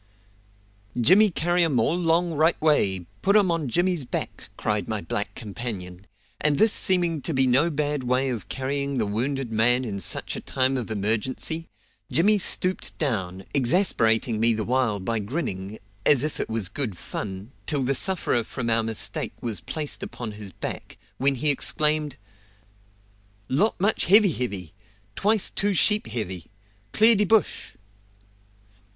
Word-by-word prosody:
"Jimmy 190 - +6
carry 175 0 +1
um 145 -7 +1
all 145 +9 +1
'long 170 0 +1
right 160 +3 +2
way; 100 - +1 0.2
put 200 +2 +2
um 195 -4 +3
on 160 -5 -2
Jimmy's 175 +2 0
back!" 120 - -5
cried - - -1
my - - -2
black - - -4
companion; 100 -4 -6 0.3
and 150 -1 +2
this 220 0 +4
seeming 175 -5 +2
to 160 +2 -3
be 135 0 +3
no 135 +6 +3
bad 150 -2 -2
way 130 +2 0
of 115 -7 -5
carrying 140 +1 -2
the 110 - +1
wounded 125 +4 -2
man 120 +3 +3
in 100 -4 -4
such - - -1
a - - -4
time 130 0 +1
of 125 -4 -4
emergency, 110 +10 -2 0.4
Jimmy 205 +5 +4
stooped 185 0 -1
down, 95 - -2
exasperating 120 - +2
me 115 +1 +4
the 110 - -2
while 120 -3 0
by 110 +4 -2
grinning, 105 - -4 0.3
as 140 +1 +4
if 155 - -3
it - - -3
was 110 -4 +1
good 105 -2 -4
fun, 95 +4 -6 0.2
till 145 -4 +1
the 135 +2 +1
sufferer 165 -7 +2
from 115 +1 -4
our 115 0 +4
mistake 110 -1 -3
was 110 -6 -3
placed 150 - -4
upon 120 -3 -6
his 105 -2 -8
back, - - -7 0.2
when 135 +1 +3
he 145 +4 +1
exclaimed: 150 +1 0 1.3
"Lot 190 +13 +1
much 205 +4 +1
heavy 200 +1 +6
heavy! 100 - -4 0.4
Twice 210 0 +2
two 200 -1 0
sheep 210 +5 +2
heavy. 95 -8 -5 0.4
Clear 225 - +6
de 210 +1 +3
bush!" 220 +2 +1
130 Hz, 155 wpm, -24 LUFS, 110-165 Hz, 1.3 s, Jimmy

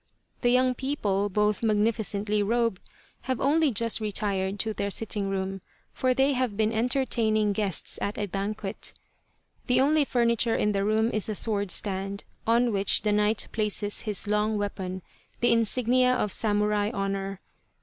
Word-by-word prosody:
The 245 - +3
young 255 +1 +3
people, 210 -7 -1
both 210 +1 +1
magnificently 210 -1 +1
robed, 230 -1 0 0.4
have 260 -2 -1
only 305 +2 +3
just 230 -1 +2
retired 200 -2 -1
to 220 -1 -2
their 200 -1 -2
sitting 205 -1 0
room, 195 0 -3 0.3
for 255 -1 +1
they 270 +2 +3
have 250 -5 -1
been 220 0 +1
entertaining 225 -3 +1
guests 200 -4 -3
at 200 - -2
a 210 - -1
banquet. 200 +1 -4 0.7
The 250 0 +3
only 295 +3 +4
furniture 235 -3 +1
in 210 - +1
the 195 -1 0
room 220 +2 +1
is 215 +1 +1
a 215 - -2
sword 205 -2 0
stand, 195 +1 -2 0.2
on 235 +1 +3
which 195 0 +2
the 210 - +1
knight 210 +1 +1
places 210 -1 -1
his 210 -3 -2
long 210 +1 0
weapon, 190 -2 -4 0.4
the 240 - +3
insignia 250 +2 +2
of 210 -5 -1
samurai 210 -1 +2
honour. 195 -3 -3
215 Hz, 155 wpm, -27 LUFS, 200-235 Hz, 0.7 s, only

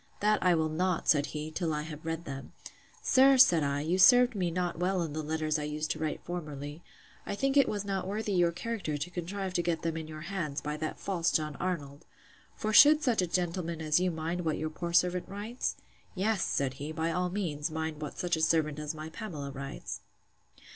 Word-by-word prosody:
That 210 +1 +2
I 180 -1 +4
will 160 -1 +1
not, 180 +2 -1
said 145 -1 +4
he, 155 +1 -5
till 160 -1 -1
I 150 - -2
have 155 -1 -8
read 165 +1 -4
them. 135 -1 -7 0.5
Sir, 270 +1 +6
said 175 -11 +7
I, 140 0 0
you 170 +5 0
served 245 +4 +7
me 185 -4 0
not 175 0 -2
well 180 0 +1
in 155 -3 -5
the 155 - -2
letters 155 0 -1
I - - -3
used 150 +1 -2
to - - -3
write 155 -1 -3
formerly: 150 -3 -6 0.4
I 200 - -4
think 270 +5 0
it 275 -2 +5
was 205 -1 -3
not 195 -2 -2
worthy 210 +1 -2
your 175 -3 +3
character 190 -5 -3
to 145 +5 -4
contrive 185 +2 -4
to 175 - +1
get 170 -2 -1
them 165 -1 -1
in 160 -1 -5
your 155 0 -8
hands, 165 -5 -3
by 150 0 -4
that 155 0 -4
false 175 -4 0
John 150 -2 0
Arnold! 145 -6 -4 0.5
for 215 0 -2
should 300 +6 +8
such 240 -7 +2
a 180 - 0
gentleman 170 -1 -2
as 155 0 +2
you 185 0 +1
mind 165 +1 -3
what 160 -2 0
your 155 0 -3
poor 170 +2 -4
servant 180 +1 +2
writes?—Yes, 205 -2 -3
said 135 -2 0
he, 150 +2 -4
by 160 +1 -1
all 180 +2 0
means, 170 -6 -2
mind 160 -1 -4
what 150 - -6
such 175 -2 0
a 160 - -3
servant 155 -2 +2
as 150 +1 -4
my 155 +1 -7
Pamela 155 -9 -6
writes. 135 0 -6
165 Hz, 215 wpm, -30 LUFS, 155-185 Hz, 0.5 s, should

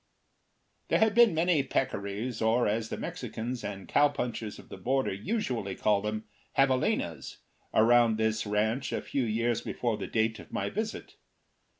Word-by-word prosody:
There - - +3
had 220 -1 +3
been 235 -6 +6
many 165 -2 +3
peccaries, 120 -3 -2
or, 115 +2 +3
as 110 +2 -1
the - - -4
Mexicans 120 +2 -5
and 100 -3 -6
cowpunchers 125 -7 0
of - - -14
the - - -8
border 130 -3 0
usually 115 - -2
call 105 -2 +2
them, 110 +1 -3 0.3
javalinas, 130 -2 +1 0.3
round 115 0 +5
this 110 0 0
ranch 110 +5 0
a - - -1
few 135 - -1
years 115 +1 0
before 120 -3 -2
the 105 - -5
date 110 0 0
of - - -13
my - - -2
visit. 220 +2 -4
115 Hz, 155 wpm, -29 LUFS, 110-135 Hz, 0.3 s, been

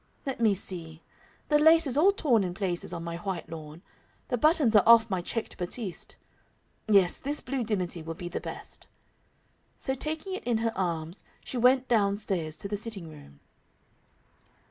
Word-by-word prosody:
Let 270 -3 -3
me 215 -3 +4
see 165 -4 -6 0.5
the 295 -1 +4
lace 320 +2 +6
is 265 - -1
all 345 +7 +5
torn 255 - +2
in 175 -1 -4
places 185 -4 -2
on 170 -1 -5
my 170 0 -4
white 185 -1 -5
lawn. 155 +1 -9 0.5
The 255 - +1
buttons 300 -7 +3
are 210 - +8
off 230 0 +6
my 185 -2 0
checked 220 +5 -5
batiste. 185 +1 -4 0.7
Yes, 195 -4 +4
this 290 +2 -2
blue 260 -1 -3
dimity 185 -6 -1
will 165 +1 -6
be 175 +1 -6
the 175 - -4
best." - - -8 0.9
So 265 - -2
taking 310 +7 -4
it 380 - -5
in 240 -2 +1
her 225 0 -1
arms, 170 -1 -3 0.2
she - - -6
went 255 +2 +4
down 200 -4 +2
stairs 170 -7 -2
to - - -5
the 205 +1 -2
sitting 200 -6 -6
room. 145 - -15
205 Hz, 175 wpm, -28 LUFS, 175-250 Hz, 0.9 s, are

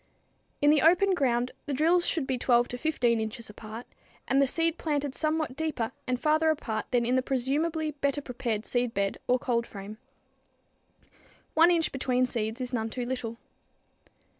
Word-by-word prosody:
In 290 - +7
the 300 - +4
open 360 +5 +5
ground 250 -6 +1 0.2
the 285 - -1
drills 335 +5 +3
should 315 -5 0
be 260 -2 -2
12 240 -1 +3
to 245 - -5
15 245 -7 +1
inches 220 0 -4
apart, 220 +3 -9 0.4
and 270 +1 +3
the 275 - +4
seed 330 +4 0
planted 290 -3 -1
somewhat 310 -2 -1
deeper 300 -7 -2 0.2
and 250 -1 0
farther 310 +2 +3
apart 230 -8 -2
than 245 -2 +2
in 250 +2 +1
the 260 - +3
presumably 300 +5 -1
better 280 0 -1
prepared 235 -5 -3
seedbed 230 -6 -1
or 250 - +4
cold 235 -2 -1
frame. 205 +2 -9 1.5
One 330 +2 +6
inch 335 -2 +2
between 255 -1 +1
seeds 225 -1 -3
is 255 0 -4
none 225 -2 -1
too 245 +2 -4
little. 240 -2 -4
255 Hz, 165 wpm, -28 LUFS, 235-310 Hz, 1.5 s, In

